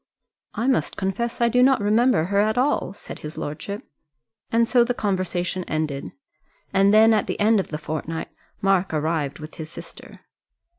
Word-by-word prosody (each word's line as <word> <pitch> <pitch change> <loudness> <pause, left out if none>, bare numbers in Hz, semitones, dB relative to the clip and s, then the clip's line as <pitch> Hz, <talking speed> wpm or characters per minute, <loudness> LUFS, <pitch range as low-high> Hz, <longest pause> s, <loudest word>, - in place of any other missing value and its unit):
"I 230 - -1
must 265 -2 +1
confess 230 +6 -2
I 235 - +5
do 245 +2 +3
not 265 +1 +5
remember 215 -2 +3
her 200 +4 0
at 215 +2 +2
all," 260 -6 +1
said 200 - -10
his 150 +1 -8
lordship. 155 +8 -5 0.6
And 230 0 +3
so 245 0 +5
the 245 +1 -1
conversation 185 -3 -1
ended. 155 -3 -3 0.6
And 195 +1 +4
then 220 +1 +6
at 215 - +1
the - - -3
end 215 +1 +4
of 190 - -2
the 150 - -4
fortnight 155 +1 -5 0.3
Mark 190 -3 +2
arrived 155 -2 -1
with 155 0 -10
his 155 - -6
sister. - - -11
195 Hz, 170 wpm, -23 LUFS, 160-230 Hz, 0.6 s, then